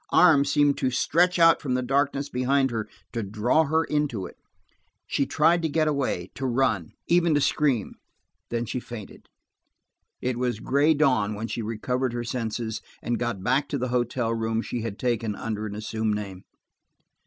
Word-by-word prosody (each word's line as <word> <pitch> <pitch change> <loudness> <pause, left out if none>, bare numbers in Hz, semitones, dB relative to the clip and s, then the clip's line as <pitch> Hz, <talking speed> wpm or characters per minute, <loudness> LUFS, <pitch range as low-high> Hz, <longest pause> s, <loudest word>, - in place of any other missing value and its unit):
Arms 145 -6 +5
seemed 145 -1 +3
to 130 - +1
stretch 175 +8 +2
out 165 -1 +6
from 130 -3 -1
the 125 - 0
darkness 140 +2 0
behind 135 +1 +1
her, 110 -2 -3 0.2
to 115 - -1
draw 110 +10 +1
her 160 +2 +2
into 150 - -1
it - - -10 0.7
She 140 - 0
tried 165 +3 +3
to 160 - 0
get 155 +1 +1
away, 135 -12 -1
to 135 - -3
run, 120 -9 0
even 170 -2 +3
to - - +4
scream–then 120 -3 -2
she 125 - -3
fainted. 120 -4 -10 0.9
It 125 -1 -2
was 125 -3 -1
gray 145 +6 +3
dawn 125 -9 +2
when 110 +2 -4
she 115 - -3
recovered 120 +3 -2
her 120 0 -3
senses 115 -2 -3 0.2
and 120 0 -1
got 120 -6 -2
back 135 +5 +1
to 140 - -1
the 125 -1 -2
hotel 120 -1 0
room 115 0 -1
she 120 - -4
had 110 -3 -4
taken 115 -4 -1
under 110 0 -4
an 105 - -6
assumed 110 0 -2
name. 100 -3 -6
125 Hz, 175 wpm, -26 LUFS, 110-140 Hz, 0.9 s, out